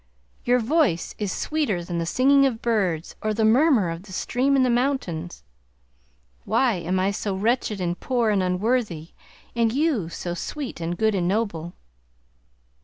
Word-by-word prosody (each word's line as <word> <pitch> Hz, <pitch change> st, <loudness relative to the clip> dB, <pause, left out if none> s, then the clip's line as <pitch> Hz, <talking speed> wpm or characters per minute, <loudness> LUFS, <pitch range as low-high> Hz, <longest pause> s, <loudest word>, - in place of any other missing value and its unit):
Your 245 Hz, +1 st, +4 dB
voice 250 Hz, -, +1 dB
is 205 Hz, -3 st, -2 dB
sweeter 240 Hz, -, -1 dB
than 170 Hz, 0 st, -3 dB
the 165 Hz, -, -2 dB
singing 275 Hz, +6 st, +4 dB
of 235 Hz, -4 st, -3 dB
birds 190 Hz, -9 st, -1 dB
or 215 Hz, 0 st, -1 dB
the 220 Hz, 0 st, +2 dB
murmur 235 Hz, -, +4 dB
of 165 Hz, +1 st, -6 dB
the 195 Hz, 0 st, -14 dB
stream 260 Hz, +8 st, 0 dB
in 265 Hz, -, +4 dB
the 255 Hz, -, +2 dB
mountains. 235 Hz, -, -2 dB, 1.0 s
Why 250 Hz, -, +2 dB
am 180 Hz, 0 st, -1 dB
I 190 Hz, +2 st, +1 dB
so 200 Hz, -1 st, -3 dB
wretched 215 Hz, 0 st, 0 dB
and 175 Hz, -1 st, -2 dB
poor 240 Hz, -4 st, +1 dB
and 200 Hz, -2 st, +2 dB
unworthy, 185 Hz, -3 st, -1 dB, 0.4 s
and 230 Hz, -1 st, +2 dB
you 270 Hz, -, 0 dB
so 175 Hz, +1 st, -5 dB
sweet 260 Hz, -, -5 dB
and 170 Hz, +1 st, -3 dB
good 220 Hz, +1 st, +2 dB
and 180 Hz, -3 st, 0 dB
noble? 180 Hz, -5 st, -2 dB
215 Hz, 165 wpm, -24 LUFS, 175-250 Hz, 1.0 s, Your